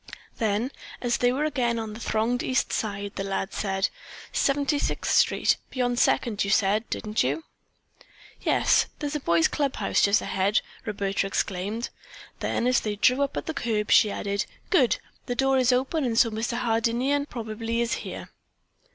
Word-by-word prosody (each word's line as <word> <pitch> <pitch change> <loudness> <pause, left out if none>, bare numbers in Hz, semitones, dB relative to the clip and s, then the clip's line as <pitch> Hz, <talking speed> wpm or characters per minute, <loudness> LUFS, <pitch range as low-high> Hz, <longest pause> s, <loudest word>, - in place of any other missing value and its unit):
Then, 220 +4 0 0.3
as 240 -1 0
they 245 0 +3
were 275 +4 -1
again 245 -6 0
on 220 -2 -4
the 220 - -9
thronged 230 +2 0
East 255 - 0
Side, 200 -2 -3
the 195 - -2
lad 195 0 -3
said: 195 -1 0 0.4
"Seventy 285 +1 +1
sixth - - -1
Street, - - +3
beyond 245 -2 0
Second, 215 -4 +2
you 200 - -2
said, 210 +2 +2
didn't 215 0 -1
you?" 145 +5 0 1.0
"Yes. - - +3
There 295 - -5
is 290 - -3
the 300 - -1
Boys' 170 - +3
Club 280 -3 -1
House - - +1
just 200 +1 +4
ahead," 195 +2 +1 0.3
Roberta 200 -2 -1
exclaimed. 200 +4 -2 0.5
Then - - -1
as 250 0 +4
they 210 -1 -3
drew 250 +6 +3
up 280 -1 -1
at - - -3
the 320 - -3
curb, 225 -7 -1
she 210 - +6
added: 200 0 -2 0.2
"Good! 280 - +4 0.3
The 245 - -1
door 270 +1 +3
is 255 0 +4
open 265 +5 +1
and 235 -3 -1
so 230 -1 +5
Mr. 230 +3 -2
Hardinian 245 +4 +1
probably 225 -1 -4
is 235 -1 0
here." - - -7
230 Hz, 175 wpm, -26 LUFS, 205-255 Hz, 1.0 s, she